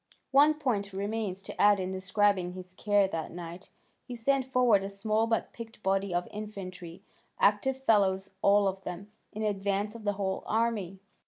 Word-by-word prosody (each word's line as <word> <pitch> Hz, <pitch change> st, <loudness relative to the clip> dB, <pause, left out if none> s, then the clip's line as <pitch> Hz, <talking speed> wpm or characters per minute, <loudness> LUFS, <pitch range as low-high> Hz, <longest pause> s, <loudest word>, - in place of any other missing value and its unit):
One 290 Hz, +3 st, +6 dB
point 215 Hz, -10 st, -1 dB
remains 200 Hz, -1 st, -3 dB
to -, -, -5 dB
add 205 Hz, -1 st, +6 dB
in 185 Hz, 0 st, -3 dB
describing 190 Hz, -1 st, +1 dB
his 185 Hz, 0 st, -10 dB
care 205 Hz, 0 st, +2 dB
that 165 Hz, -3 st, -4 dB
night; 175 Hz, +2 st, -8 dB, 0.3 s
he 245 Hz, -, -7 dB
sent 265 Hz, +3 st, +1 dB
forward 245 Hz, -6 st, +4 dB
a 195 Hz, -, -4 dB
small 215 Hz, +3 st, 0 dB
but 225 Hz, -1 st, -1 dB
picked 225 Hz, -2 st, -10 dB
body 195 Hz, 0 st, +1 dB
of 175 Hz, 0 st, -1 dB
infantry, 190 Hz, -4 st, -8 dB, 0.4 s
active 260 Hz, +6 st, +2 dB
fellows 195 Hz, -4 st, +2 dB
all 200 Hz, 0 st, +4 dB
of 190 Hz, 0 st, -2 dB
them, 190 Hz, +4 st, -7 dB, 0.2 s
in 215 Hz, -, -5 dB
advance 200 Hz, 0 st, -1 dB
of 230 Hz, -2 st, -10 dB
the 205 Hz, -1 st, 0 dB
whole 195 Hz, -1 st, -2 dB
army. 215 Hz, -5 st, 0 dB
200 Hz, 170 wpm, -29 LUFS, 190-220 Hz, 0.4 s, One